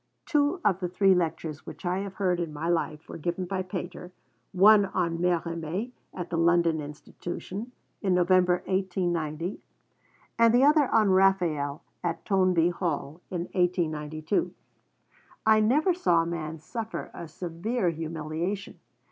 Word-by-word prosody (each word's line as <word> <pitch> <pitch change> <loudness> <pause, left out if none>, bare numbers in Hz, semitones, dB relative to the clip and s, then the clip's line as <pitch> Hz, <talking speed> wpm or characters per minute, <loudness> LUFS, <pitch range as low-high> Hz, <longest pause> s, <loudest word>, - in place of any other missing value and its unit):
Two 295 +2 +2
of 190 -3 +3
the 180 - -1
three 195 +2 +4
lectures 160 -3 -2
which - - -9
I 180 +2 0
have 195 -1 -5
heard 180 -3 +1
in 170 -3 -2
my 150 +2 -4
life 160 -3 -1
were - - -8
given 175 +3 -2
by 190 +1 -2
Pater, 180 -1 -6 0.4
one 205 +2 +6
on 170 -3 -1
Mérimée, 170 +4 -1 0.2
at 180 -2 -6
the 165 - 0
London 170 -1 +3
Institution, 175 +8 -7 0.3
in 190 -3 +2
November 180 0 +3
1890, 175 -3 -1 0.8
and 230 0 +6
the 250 - +5
other 295 -1 +5
on 215 -3 +4
Raphael, 175 -7 +2 0.2
at 170 -2 -3
Toynbee 185 -4 +3
Hall, 165 -2 -3
in 175 -2 -3
1892. 155 -2 0 0.9
I 220 0 +6
never 290 - +3
saw 175 - +2
a - - -4
man 160 -2 -4
suffer 220 +8 -6
a 170 - -7
severer 180 +5 -2
humiliation. 165 +4 -4
180 Hz, 140 wpm, -27 LUFS, 165-195 Hz, 0.9 s, one